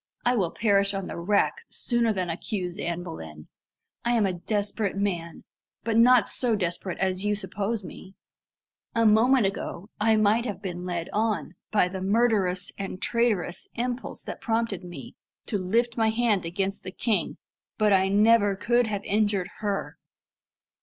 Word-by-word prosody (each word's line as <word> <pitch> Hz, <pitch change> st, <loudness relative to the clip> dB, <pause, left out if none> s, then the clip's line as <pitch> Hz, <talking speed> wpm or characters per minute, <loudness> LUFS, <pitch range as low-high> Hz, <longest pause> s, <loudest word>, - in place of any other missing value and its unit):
I 245 Hz, +1 st, +3 dB
will 190 Hz, -7 st, +1 dB
perish 200 Hz, 0 st, +2 dB
on 195 Hz, -1 st, -3 dB
the -, -, -6 dB
rack 200 Hz, +4 st, +2 dB, 0.2 s
sooner 240 Hz, -2 st, +1 dB
than 185 Hz, -4 st, -1 dB
accuse 180 Hz, +1 st, -4 dB
Anne 170 Hz, +1 st, -2 dB
Boleyn. 80 Hz, -, -9 dB, 0.6 s
I 240 Hz, -, +1 dB
am 225 Hz, -3 st, +3 dB
a 190 Hz, -, 0 dB
desperate 205 Hz, +2 st, -2 dB
man, 175 Hz, -5 st, -2 dB, 0.4 s
but 225 Hz, -1 st, 0 dB
not 235 Hz, -1 st, +6 dB
so 240 Hz, -3 st, 0 dB
desperate 180 Hz, -1 st, -3 dB
as 190 Hz, 0 st, 0 dB
you 210 Hz, 0 st, +1 dB
suppose 205 Hz, +2 st, -3 dB
me. 190 Hz, +1 st, -11 dB, 0.8 s
A 230 Hz, 0 st, +3 dB
moment 225 Hz, +3 st, +5 dB
ago 195 Hz, 0 st, -4 dB
I 220 Hz, +1 st, +4 dB
might 215 Hz, +2 st, +3 dB
have 205 Hz, -6 st, -4 dB
been 180 Hz, -3 st, -5 dB
led 175 Hz, -2 st, -3 dB
on, 215 Hz, 0 st, 0 dB, 0.2 s
by 205 Hz, -4 st, +3 dB
the 185 Hz, +1 st, -5 dB
murderous 200 Hz, -3 st, +1 dB
and 195 Hz, -1 st, -4 dB
traitorous 215 Hz, -8 st, 0 dB
impulse 245 Hz, +2 st, -3 dB
that -, -, -7 dB
prompted 225 Hz, -5 st, -1 dB
me, 175 Hz, -7 st, -9 dB, 0.3 s
to 205 Hz, -, -2 dB
lift 230 Hz, +6 st, 0 dB
my 225 Hz, -1 st, +3 dB
hand 220 Hz, -5 st, +1 dB
against 195 Hz, +3 st, -2 dB
the 185 Hz, -, -7 dB
king, 220 Hz, +2 st, -1 dB, 0.4 s
but 210 Hz, -2 st, +4 dB
I 190 Hz, 0 st, +4 dB
never 205 Hz, 0 st, +4 dB
could 240 Hz, +4 st, +2 dB
have 205 Hz, -2 st, -3 dB
injured 205 Hz, -3 st, +1 dB
her." 205 Hz, -2 st, -3 dB
205 Hz, 160 wpm, -26 LUFS, 185-225 Hz, 0.8 s, not